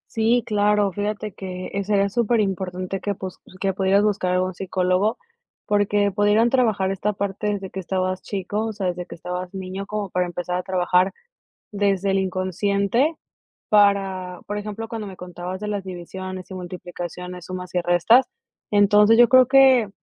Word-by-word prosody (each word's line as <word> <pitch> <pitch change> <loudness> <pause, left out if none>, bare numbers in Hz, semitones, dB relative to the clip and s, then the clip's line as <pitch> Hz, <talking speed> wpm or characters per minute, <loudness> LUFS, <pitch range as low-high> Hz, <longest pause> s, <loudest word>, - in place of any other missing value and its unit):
Sí, 230 +2 +3
claro, 210 -1 +2
fíjate 210 +1 -3
que, 185 -2 -6
eh, 200 0 -1
sería 200 0 +2
superimportante 195 -5 -1
que 205 - -1
pues, 190 -1 -8 0.2
que 195 -1 0
pudieras 195 +2 +3
buscar 200 -3 0
algún 185 +1 0
psicólogo, 185 +3 0 0.5
porque 205 0 +2
pudieran 205 +3 +3
trabajar 220 -7 +2
esta 195 +2 -1
parte 200 +1 -3
desde 195 -2 -5
que 190 - -5
estabas 185 0 -2
chico, 205 +2 -3
o - - -2
sea, 195 -3 -3
desde 180 0 -3
que - - -10
estabas 180 +2 -6
niño, 190 +1 -5
como 210 -1 -4
para 180 0 0
empezar 175 0 -4
a 180 - -2
trabajar 180 0 +2 0.6
desde 200 -1 +1
el 195 - +2
inconsciente 200 - 0 0.5
para, 195 -3 +2
por 205 - -3
ejemplo, 210 +2 -5
cuando 220 -3 -5
me 190 - -10
contabas 180 +1 -6
de 210 - -4
las 205 -1 -2
divisiones 185 0 -7
y - - -6
multiplicaciones, 180 0 -7
sumas 180 0 -7
y 180 - +2
restas. 175 +9 +4 0.4
Entonces, 210 +2 +5
yo 240 -1 +7
creo 255 0 +6
que 260 -4 +6
195 Hz, 165 wpm, -23 LUFS, 185-210 Hz, 0.6 s, yo